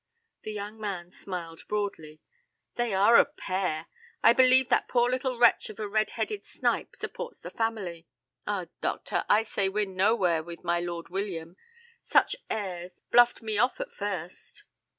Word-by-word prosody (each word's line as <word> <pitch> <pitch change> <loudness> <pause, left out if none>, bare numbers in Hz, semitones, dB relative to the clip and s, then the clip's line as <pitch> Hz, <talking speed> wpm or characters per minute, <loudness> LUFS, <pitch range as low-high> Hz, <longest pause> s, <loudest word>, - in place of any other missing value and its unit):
The 215 - -6
young 210 +1 -6
man 185 -5 -5
smiled 170 -4 -7
broadly. 165 -7 -4 0.5
"They 240 -2 -1
are 200 +4 +6
a - - +7
pair. 185 - -3 0.4
I - - +8
believe 255 +1 +7
that - - +2
poor 240 -1 +3
little 255 0 -1
wretch 240 - +4
of 215 0 -10
a 215 - -3
red 215 +1 +1
headed 425 -2 -2
snipe - - -2
supports - - -6
the - - -9
family. 195 -8 -3 0.4
Ah, 200 -3 -1 0.2
doctor, - - -1
I 215 +2 +5
say 200 -3 -1
we're 210 +2 0
nowhere 190 -3 +2
with 170 +1 -10
my 175 0 +1
Lord 170 -1 -5
William. 180 -3 -4 0.5
Such - - +3
airs; 185 -4 -4 0.2
bluffed 240 -1 +5
me 215 -2 -1
off 250 - +2
at - - -5
first." 185 -4 -6
205 Hz, 160 wpm, -28 LUFS, 175-230 Hz, 0.5 s, I